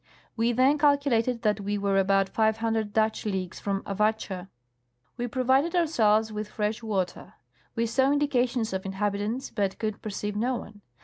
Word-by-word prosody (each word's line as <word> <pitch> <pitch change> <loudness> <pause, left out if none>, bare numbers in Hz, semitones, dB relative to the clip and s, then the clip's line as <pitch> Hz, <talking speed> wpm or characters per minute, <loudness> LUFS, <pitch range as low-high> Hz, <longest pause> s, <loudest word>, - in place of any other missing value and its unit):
We 230 +1 +2
then 260 +5 +3
calculated 275 -5 +2
that 210 -1 +2
we 205 +1 -2
were 200 -1 +1
about 195 0 +3
five 220 +1 +1
hundred 225 -2 -1
Dutch 220 +1 +1
leagues 190 -4 -3
from 195 -1 -2
Avatscha. 200 -2 -1 0.7
We 245 - -3
pro 255 +2 -2
vided 270 +7 +3
ourselves 220 -10 +3
with 210 0 -4
fresh 210 +1 -2
water. 195 -5 -3 0.4
We 230 -1 +1
saw 265 +4 +2
indications 250 -6 +1
of 190 0 -2
inhabitants, 205 +5 -2
but 200 -4 -1
could 215 -2 -3
perceive 205 0 -4
no 245 +5 0
one. 210 -3 -9
220 Hz, 165 wpm, -27 LUFS, 205-245 Hz, 0.7 s, then